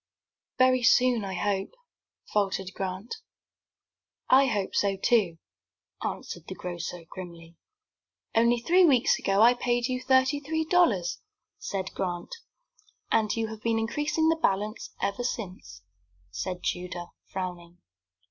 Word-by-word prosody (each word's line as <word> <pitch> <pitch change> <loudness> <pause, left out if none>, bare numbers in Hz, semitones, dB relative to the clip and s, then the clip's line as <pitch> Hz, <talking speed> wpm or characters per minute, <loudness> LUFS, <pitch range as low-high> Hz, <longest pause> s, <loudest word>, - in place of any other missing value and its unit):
"Very 255 0 +4
soon, 245 -1 +4
I 190 -1 -4
hope," 195 - -1 0.6
faltered 195 -2 0
Grant. 190 - -5 1.1
"I 270 +1 +7
hope 205 -6 -1
so, 195 -1 +1
too," 195 -5 +2 0.7
answered - - -5
the - - -6
grocer, 175 -1 -6
grimly. 170 -2 -10 0.8
"Only 235 +1 +4
three 355 +10 +4
weeks 265 -8 +4
ago 195 +2 +3
I 240 +2 +7
paid 245 -1 0
you 255 0 -2
thirty 260 +2 +3
three 320 +2 -2
dollars," 310 - +2 0.4
said 190 -2 -4
Grant. 175 -2 -4 0.8
"And 215 -2 +2
you 225 -1 -1
have 220 -1 -8
been 230 0 +1
increasing 295 +8 0
the 325 - +2
balance 210 0 0
ever 200 +4 -1
since," 180 - -5 0.5
said 175 - -4
Tudor, 180 -1 -3 0.2
frowning. 175 -2 -6
210 Hz, 125 wpm, -27 LUFS, 185-250 Hz, 1.1 s, I